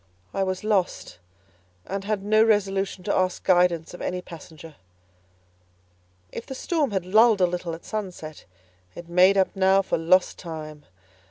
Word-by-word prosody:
I 195 - -1
was 185 0 -2
lost 200 - -1 0.7
and 195 0 -5
had 210 -2 -2
no 215 +2 +4
resolution 195 -3 0
to 200 - -1
ask 185 -1 0
guidance 175 -3 +2
of 175 - -10
any 180 - -3
passenger. 165 -2 -12 1.6
If - - -8
the 265 - -6
storm 310 +1 -1
had 190 -4 -2
lulled 215 +3 +4
a 180 - +5
little 175 -1 -4
at 165 - -15
sunset, 185 -8 -6 0.5
it 170 - -10
made 180 +3 +4
up 190 +1 +1
now 190 0 +3
for 175 - -1
lost 180 +3 +2
time. 155 -3 -8
185 Hz, 155 wpm, -24 LUFS, 175-200 Hz, 1.6 s, a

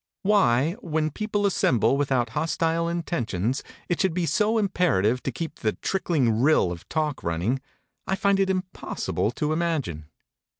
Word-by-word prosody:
Why, 165 - +3
when 155 -2 -1
people 210 +3 -1
assemble 125 - +3
without 135 -4 +1
hostile 165 +4 0
intentions, 125 - -2 0.3
it 175 - 0
should 190 -4 +1
be 180 -2 +1
so 210 +9 +2
imperative 150 - +2
to 135 - -2
keep 160 +6 -6
the 110 - 0
trickling 135 - 0
rill 140 - +4
of 85 -1 -9
talk 155 -3 -1
running, 90 +11 -1 0.5
I 190 - +1
find 200 -1 +2
it 195 -1 +2
impossible 185 - -2
to 150 +3 -1
imagine. 145 - -2
155 Hz, 145 wpm, -25 LUFS, 120-180 Hz, 0.5 s, rill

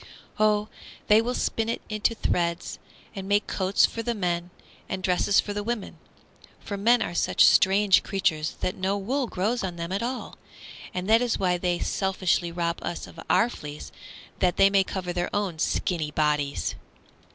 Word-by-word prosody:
"Oh, 210 0 +3 0.4
they 210 +1 +7
will 245 +2 -2
spin 225 0 -1
it 230 - -3
into 215 +2 0
threads 170 -4 -1 0.4
and 195 -1 -6
make 205 +1 +3
coats 190 0 +2
for 230 - -4
the 235 +1 -2
men 175 -3 -2 0.4
and 190 0 -4
dresses 190 +2 +3
for 205 - -1
the 205 - -2
women. 225 -1 -4 0.6
For 200 - -6
men 230 +4 +3
are - - -5
such 170 - +4
strange 195 0 +5
creatures 160 -5 -1
that 180 - -1
no 190 +2 -1
wool 250 +7 -1
grows 215 +5 -1
on 180 -2 -3
them 170 +1 -5
at 195 - -1
all, 250 +2 -5 0.5
and 180 +1 -4
that 225 +2 +5
is 245 -2 0
why 180 -2 +1
they 175 -1 0
selfishly 185 -3 0
rob 170 0 -2
us 175 - -4
of 165 - -13
our 230 - +4
fleece 150 -10 -8 0.5
that 180 -2 +1
they 195 0 +6
may 195 -1 +4
cover 185 -2 -4
their 175 0 -1
own 195 -6 -2
skinny 160 -2 -1
bodies!" 150 - 0
190 Hz, 175 wpm, -26 LUFS, 175-210 Hz, 0.6 s, they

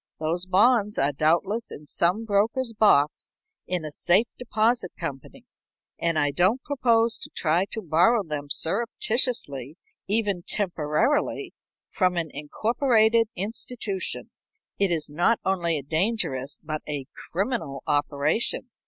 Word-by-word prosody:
Those 170 +4 -1
bonds 210 +2 +3
are 140 +1 +2
doubtless 175 - +1
in 150 - -9
some 180 +9 +1
broker's 225 +4 0
box 165 -9 +2 0.3
in 180 -3 -2
a 155 - -5
safe 180 +8 +3
deposit 230 -4 0
company, 140 -6 -7 0.5
and 165 -1 +1
I 145 -1 +2
don't 190 - +2
propose 235 -5 +2
to - - -7
try 170 +3 +2
to 220 +2 -6
borrow 180 +8 +3
them 150 -4 -5
surreptitiously, 195 - -1 0.3
even 205 -3 +1
temporarily, 175 - -1 0.4
from 180 -2 +1
an 165 -3 -2
incorporated 225 - +2
institution. 205 0 -4 0.5
It 200 -1 +3
is 165 -3 -1
not 175 +10 +1
only 170 -4 +1
a 140 - -5
dangerous 145 - -1
but 155 -1 -4
a 145 -3 -3 0.2
criminal 175 - -2
operation. 150 - 0
185 Hz, 125 wpm, -25 LUFS, 155-225 Hz, 0.5 s, bonds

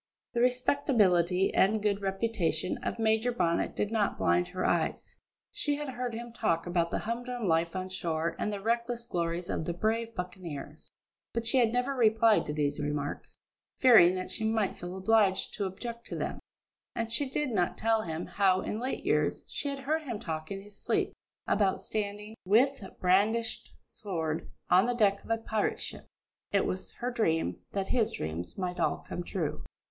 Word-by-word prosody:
The 235 - +1
respectability 210 - +3
and 215 +3 +4
good 205 -1 0
reputation 195 -4 -1
of - - -3
Major 220 +2 +2
Bonnet 170 -8 0
did 210 - -1
not 215 -3 +1
blind 175 0 +2
her 185 +1 -3
eyes. - - 0 0.3
She 290 -1 -1
had 295 -1 -4
heard 245 -2 -3
him 235 0 -7
talk 165 -7 0
about 175 -1 +1
the - - -1
humdrum 240 0 -3
life 165 +1 +2
on 185 0 -2
shore 165 -2 -1
and 210 - 0
the 200 -1 -4
reckless 235 +1 -1
glories 170 -4 -2
of 160 - -2
the 170 - -2
brave 225 +4 -1
buccaneers, 175 -5 -7 0.4
but 230 0 -2
she 245 +3 +3
had 230 -3 +4
never 250 +3 0
replied 225 -3 +4
to 150 - -2
these 145 -1 0
remarks, 145 -1 -3 0.4
fearing 215 -9 +7
that 185 0 -4
she - - -3
might 220 -3 +1
feel 175 +2 -6
obliged 200 -1 +3
to 200 - -2
object 235 +5 -6
to - - -5
them, - - -3 0.6
and 230 -1 -2
she 275 +3 +1
did 290 0 -1
not 180 -5 0
tell 225 0 +2
him 165 -3 -4
how, 190 -2 +2
in 210 - -3
late 255 +3 -3
years, - - +1
she 285 - -3
had 275 -1 -4
heard 310 +4 0
him 240 -8 -5
talk 155 -3 -4
in 195 0 -5
his 205 0 -13
sleep - - 0 0.3
about 195 -2 +2
standing, 210 +1 -4
with 240 +6 +3 0.2
brandished 210 +5 +2
sword, 165 -5 -3 0.2
on 185 +5 +5
the 245 - 0
deck 200 -4 +3
of - - -15
a 225 - +2
pirate 220 -1 -1
ship. - - -8 0.4
It 200 - +3
was 185 +1 -3
her 245 +1 -3
dream, 165 - +1 0.2
that 195 -1 -2
his 225 -3 +2
dreams 80 +3 -4
might 180 -2 -3
all - - 0
come - - -4
true. 175 -3 -3
205 Hz, 185 wpm, -30 LUFS, 180-230 Hz, 0.6 s, fearing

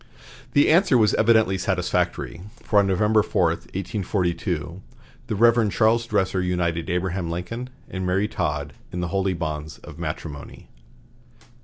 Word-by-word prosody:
The 145 - +5
answer 165 -5 +5
was 110 -2 +4
evidently 110 -4 +3
satisfactory, 90 -2 -1 0.2
for 105 - +3
on 100 - +3
November 105 +3 +3
4, 90 -4 +1
1842, 90 -2 -3 0.5
the 110 - -2
Rev. 115 0 +4
Charles 115 +3 +2
Dresser 95 -3 0
united 85 -2 -1
Abraham 90 0 -1
Lincoln 90 +9 -5 0.2
and 95 0 -5
Mary 95 +3 +1
Todd 75 -8 -3 0.2
in 90 - -3
the 90 - -2
holy 95 0 0
bonds 75 -2 -4
of 75 - -11
matrimony. 75 -3 -7
95 Hz, 135 wpm, -24 LUFS, 85-105 Hz, 0.5 s, The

